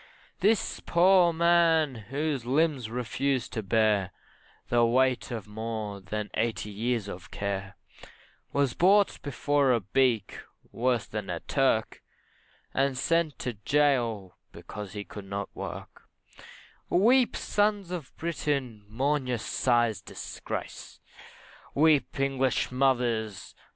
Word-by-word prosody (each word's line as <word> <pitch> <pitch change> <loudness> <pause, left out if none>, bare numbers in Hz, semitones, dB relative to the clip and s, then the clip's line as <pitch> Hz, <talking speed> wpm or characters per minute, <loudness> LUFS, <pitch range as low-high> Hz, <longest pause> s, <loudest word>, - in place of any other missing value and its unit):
This 210 +1 +1
poor 180 +1 +5
old 170 - -1
man, 165 -3 +4 0.2
whose 145 -1 -1
limbs 135 -2 +1
refused 125 +2 -2
to 110 - -2
bear 105 -2 +2 0.6
The 120 0 +3
weight 130 +2 +2
of 115 -5 -5
more 110 -1 -5
than 105 +2 -5
eighty 110 -2 -2
years 115 +1 -1
of 95 -1 -8
care, 100 0 -4 0.7
Was 140 -3 +1
brought 200 +3 +3
before 145 -1 +1
a 120 - +3
beak, 115 +1 0 0.3
worse 120 0 0
than 105 -3 -5
a 85 -2 -2
Turk, 130 -5 0 0.7
And 135 -1 +1
sent 165 +1 +1
to 125 - -2
gaol 115 -5 +1 0.2
because 105 -3 -9
he 105 -1 -5
could 100 0 -10
not 100 +1 -5
work, - - -8 0.8
Weep, 240 +7 +4
sons 205 -3 0
of 170 -7 -5
Britain, 140 -9 -2
mourn 135 +5 0
your 125 -1 0
sires' 120 -2 +1
disgrace! - - -7 0.8
Weep, 150 -2 +3
English 135 -2 0
mothers! 120 -6 0
125 Hz, 120 wpm, -28 LUFS, 110-145 Hz, 0.8 s, poor